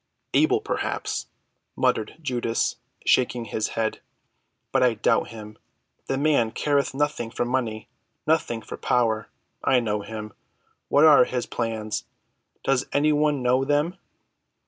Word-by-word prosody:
"Able, - - +4
perhaps," - - -3 0.5
muttered 110 -1 0
Judas 120 -5 -1 0.3
shaking 125 -2 +2
his 110 0 -2
head, 110 -1 -1 0.7
"but 135 - +2
I 125 -2 +4
doubt 110 - +2
him. 110 -2 -10 0.5
The 135 - 0
man 140 -5 +3
careth 140 +2 0
nothing 145 -5 -1
for 120 +1 -2
money—nothing 120 +2 -2
for - - -7
power. 110 -3 +1 0.3
I 130 - +4
know 105 -3 -1
him. 110 0 -7 0.5
What 145 +2 +5
are 150 -5 +8
his 125 -2 -2
plans? 110 -2 -3 0.6
Does 135 -2 +1
any 150 +2 +3
one 150 -2 +1
know 125 +2 +3
them? 145 +5 +1
125 Hz, 125 wpm, -25 LUFS, 110-140 Hz, 0.7 s, are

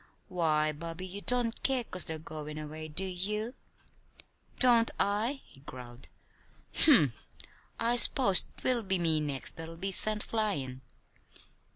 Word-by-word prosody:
"Why, 155 -4 0
Bobby, 165 +4 -8
you 190 +2 -9
don't 245 -1 0
care 265 -2 0
'cause 185 -5 -2
they're 160 - -5
goin' 155 -1 -9
away; 155 +1 -8
do 155 +5 -2
you?" 210 +5 -5 1.1
"Don't 235 -3 +5
I?" 220 +7 -2
he - - -21
growled. 125 -2 -12 0.6
"Humph! 155 - +2 0.5
I 235 +1 0
s'pose 235 -6 +7
'twill 250 -2 -1
be 190 -3 -2
me 165 -3 0
next 145 -3 -2
that'll 165 0 -8
be 195 +3 -4
sent 215 +2 +2
flyin'." 145 - -4
180 Hz, 135 wpm, -29 LUFS, 155-220 Hz, 1.1 s, s'pose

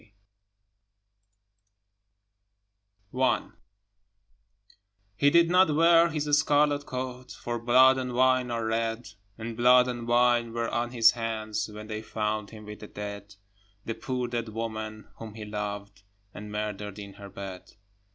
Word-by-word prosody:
Y - - -15 0.2
Z - - -13
I - - -21 1.7
HE 140 - +4
did 170 +2 +4
not 180 -4 +4
wear 165 +1 +5
his 150 -1 -2
scarlet 145 -1 +2
coat, 130 0 -5
For 120 0 -4
blood 130 +3 +5
and 125 -1 -4
wine 130 0 +3
are 115 -1 -2
red, 115 +1 -2 0.3
And 115 0 -6
blood 125 +1 +5
and 120 -2 -4
wine 120 -1 +3
were 115 0 -2
on 120 0 -1
his 115 -2 +5
hands 110 -2 -3
When 105 0 -9
they 110 0 -5
found 105 -1 -3
him 105 -1 -12
with 105 0 -9
the 105 - -9
dead, 100 -1 -8 0.5
The 115 - -2
poor 125 +1 -3
dead 120 -2 -3
woman 110 -1 -5
whom 110 -2 -9
he 110 -1 -7
loved, 105 -2 -5 0.3
And 105 0 -9
murdered 105 -1 -4
in 100 -1 -9
her 100 - -9
bed. 95 -2 -9
115 Hz, 140 wpm, -27 LUFS, 105-125 Hz, 1.7 s, wear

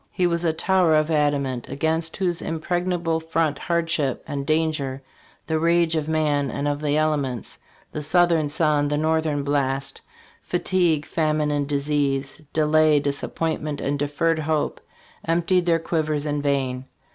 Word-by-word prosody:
He 180 - 0
was 170 -1 0
a 165 - +2
tower 175 0 +2
of 155 +1 +2
adamant, 140 -5 0
against 160 +4 -1
whose 180 -4 -1
impregna 175 +3 -1
ble 165 -1 +1
front 160 -2 -1
hardship 165 -6 -1
and 140 -2 -4
danger, 155 -4 0 0.4
the 160 0 0
rage 170 0 +2
of 155 -1 -1
man 150 -3 +1
and 140 +4 -3
of 145 0 -1
the 150 0 +1
elements, 145 -7 -1 0.3
the 150 - -4
southern 165 -1 +3
sun, 150 -1 +2
the 145 0 0
north 160 +1 +1
ern 145 -2 -1
blast, 135 -1 -1 0.4
fatigue, 175 -4 +1
famine 155 -1 0
and 145 -1 -1
disease, 140 -1 -1
delay, 155 -1 +4
dis 140 0 -2
appointment 155 -2 -3
and 140 +1 -2
deferred 155 +3 0
hope 155 0 -1 0.4
emptied 175 +2 +1
their 165 -1 +4
quivers 155 -2 -1
in 145 -1 -1
vain. 135 -3 -1
155 Hz, 155 wpm, -23 LUFS, 145-165 Hz, 0.4 s, delay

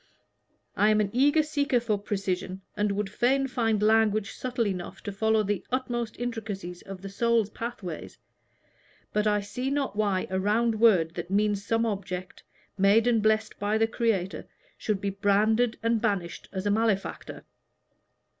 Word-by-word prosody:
I 210 - +4
am 215 0 +4
an 200 -2 0
eager 290 +5 +4
seeker 285 -4 +1
for 230 -3 0
precision, 190 -2 -3
and 210 0 +1
would 205 0 -1
fain 255 +7 +1
find 225 -5 0
language 215 -1 +3
subtle 250 -2 -2
enough 185 -3 -4
to 205 - -4
follow 220 +2 +2
the 205 -1 -2
utmost 240 -3 -2
intricacies 205 -7 -5
of 195 -1 -9
the - - -5
soul's 230 0 +1
pathways, 220 -9 -6 1.0
but 210 0 +1
I 210 -1 +2
see 250 +6 -4
not 280 -5 -1
why 205 -3 +1
a 190 - 0
round 220 +3 +1
word 185 -8 +4
that 175 - -6
means 205 0 +1
some 225 +2 +1
object, 185 -4 -4 0.4
made 200 +4 +5
and 235 -3 +3
blessed 220 0 +1
by 205 +1 +1
the 225 - +3
Creator, 220 -5 -1 0.3
should 210 -3 -2
be 200 - -1
branded 215 +4 +2
and 230 -1 +2
banished 200 -7 -2
as 190 0 -4
a 205 - +2
malefactor." 215 -2 -1
215 Hz, 160 wpm, -27 LUFS, 195-230 Hz, 1.0 s, made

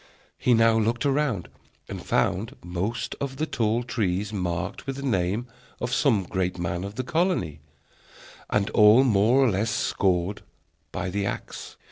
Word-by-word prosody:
He 125 - +4
now 115 0 +4
looked 115 +4 0
around, 135 - 0 0.4
and - - -7
found 105 +5 0
most 95 +6 -3
of 135 -1 -3
the 155 - 0
tall 115 -4 0
trees 105 -4 -1
marked 90 +1 -3
with 135 - -2
the 140 - -6
name 100 -2 0 0.3
of 125 +1 -3
some 115 -9 +3
great 90 0 -2
man 85 +1 -3
of 100 +1 -6
the 130 - -2
colony, 165 - 0 0.9
and 105 0 0
all 105 +4 +7
more 115 +1 +4
or 130 -4 +4
less 100 +4 0
scored 95 -2 0 0.5
by 90 - -3
the 100 0 -1
axe. - - -6
110 Hz, 155 wpm, -25 LUFS, 95-125 Hz, 0.9 s, all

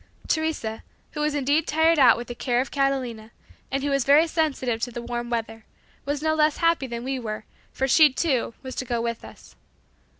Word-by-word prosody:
'" - - -19
Teresa, 315 -9 -1 0.3
who 300 - -7
was 300 0 0
indeed 290 +3 +1
tired 320 +1 +3
out 265 - +7
with 240 - -5
the 240 - -5
care 240 0 -1
of 260 - -2
Catalina, 260 -6 -1 0.4
and 275 0 -2
who 285 - 0
was 275 -2 +2
very 285 +5 +5
sensitive 275 -8 -1
to 240 -1 -3
warm 240 0 -4
weather, 225 -1 -4 0.4
was 290 +1 -2
no 315 0 +2
less 305 -1 +2
happy 335 -5 +1
than 235 -1 -5
we 265 0 -2
were, 215 -2 -5 0.3
for 265 - -1
she, 300 +2 +6
too, 260 -5 -1
was 260 -1 -6
to - - -1
go 240 -1 -1
with 230 0 -3
us. - - -14
265 Hz, 205 wpm, -24 LUFS, 240-300 Hz, 0.4 s, out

